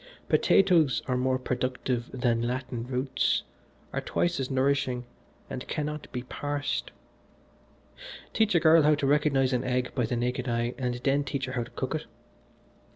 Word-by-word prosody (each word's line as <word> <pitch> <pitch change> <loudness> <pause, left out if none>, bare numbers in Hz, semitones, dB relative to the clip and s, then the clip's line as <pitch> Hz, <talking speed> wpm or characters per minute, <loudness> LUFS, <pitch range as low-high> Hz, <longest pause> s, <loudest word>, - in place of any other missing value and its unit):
Potatoes 170 -8 +4
are 130 - +1
more 130 +1 +1
productive 125 -1 -2
than 120 -3 +1
Latin 125 0 -3
roots, 130 +1 0 0.5
are - - -1
twice 175 -2 0
as 130 - -2
nourishing 130 -2 +1 0.4
and 130 - -6
cannot 150 0 -4
be 125 -2 -4
parsed. 145 +2 -3 1.4
Teach 220 -3 +2
a - - +6
girl 160 0 +6
how 150 0 +5
to 145 - -2
recognise 140 -2 +3
an 125 0 +1
egg 125 -1 -1
by 125 -4 0
the 125 - -1
naked 125 +2 -1
eye, 120 +1 0
and 125 -2 -1
then 140 +1 +2
teach 135 -1 -3
her 130 - -6
how 125 - 0
to - - -14
cook - - -2
it. - - -4
130 Hz, 160 wpm, -28 LUFS, 125-145 Hz, 1.4 s, a